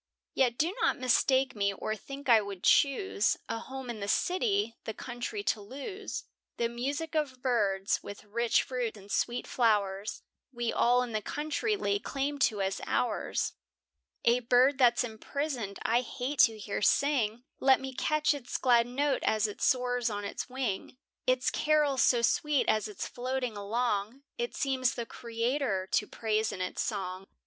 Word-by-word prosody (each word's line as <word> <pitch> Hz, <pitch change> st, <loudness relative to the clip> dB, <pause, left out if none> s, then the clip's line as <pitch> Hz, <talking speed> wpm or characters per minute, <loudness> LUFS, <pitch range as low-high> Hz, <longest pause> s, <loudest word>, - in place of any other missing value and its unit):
Yet 245 Hz, -3 st, +2 dB
do 335 Hz, +5 st, +1 dB
not -, -, +2 dB
mistake 260 Hz, +1 st, +2 dB
me, 200 Hz, -1 st, +1 dB
or 215 Hz, +2 st, -3 dB
think 275 Hz, +6 st, -9 dB
I 230 Hz, -3 st, +7 dB
would 200 Hz, -3 st, -7 dB
choose, 280 Hz, -, +3 dB
A 230 Hz, -, -3 dB
home 265 Hz, +1 st, -7 dB
in 235 Hz, -3 st, -5 dB
the 200 Hz, -, -4 dB
city, 375 Hz, -, +1 dB
the 220 Hz, -, -4 dB
country 245 Hz, -, -5 dB
to 220 Hz, -, 0 dB
lose; 285 Hz, -, -6 dB, 0.3 s
The 235 Hz, -, +1 dB
music 280 Hz, +7 st, -3 dB
of 275 Hz, -5 st, -2 dB
birds, 200 Hz, -6 st, +1 dB
with 200 Hz, -, -9 dB
rich 230 Hz, +3 st, +1 dB
fruits 245 Hz, -4 st, -3 dB
and 200 Hz, 0 st, -13 dB
sweet 240 Hz, 0 st, 0 dB
flowers, 210 Hz, -3 st, 0 dB, 0.3 s
We 240 Hz, -2 st, -2 dB
all 245 Hz, +1 st, +4 dB
in 245 Hz, -, -5 dB
the 215 Hz, -1 st, -1 dB
country 310 Hz, -, -1 dB
lay 200 Hz, -, 0 dB
claim 280 Hz, +5 st, -3 dB
to 205 Hz, -3 st, -3 dB
as 190 Hz, 0 st, -2 dB
ours. -, -, 0 dB, 0.7 s
A 235 Hz, +1 st, +5 dB
bird 250 Hz, +3 st, +4 dB
that's 240 Hz, -2 st, +5 dB
imprisoned, 240 Hz, -2 st, -4 dB
I 235 Hz, +2 st, +3 dB
hate 255 Hz, +3 st, -4 dB
to 225 Hz, -3 st, +6 dB
hear 210 Hz, -1 st, -4 dB
sing, 240 Hz, -3 st, +2 dB, 0.2 s
Let 265 Hz, 0 st, +5 dB
me 265 Hz, 0 st, -6 dB
catch 305 Hz, +3 st, +2 dB
its 275 Hz, -4 st, -4 dB
glad 240 Hz, -2 st, +4 dB
note 280 Hz, +3 st, 0 dB
as 215 Hz, -1 st, +2 dB
it 210 Hz, -, -5 dB
soars 245 Hz, -2 st, +2 dB
on 205 Hz, -1 st, -4 dB
the 200 Hz, -, -4 dB
wing; 255 Hz, -3 st, -3 dB, 0.3 s
Its 255 Hz, 0 st, +2 dB
carol 300 Hz, -3 st, +2 dB
so 240 Hz, -2 st, +4 dB
sweet 295 Hz, +3 st, +2 dB
as 215 Hz, 0 st, +2 dB
it's 210 Hz, -, -5 dB
floating 250 Hz, -2 st, -3 dB
along, 215 Hz, +3 st, -1 dB, 0.2 s
It 475 Hz, 0 st, -2 dB
seems 260 Hz, -3 st, +1 dB
the 235 Hz, -, -3 dB
Creator 230 Hz, -4 st, -2 dB
to 210 Hz, -, +2 dB
praise 220 Hz, -1 st, 0 dB
in -, -, -6 dB
its 185 Hz, 0 st, -2 dB
song. 190 Hz, -3 st, -3 dB
245 Hz, 170 wpm, -30 LUFS, 215-270 Hz, 0.7 s, I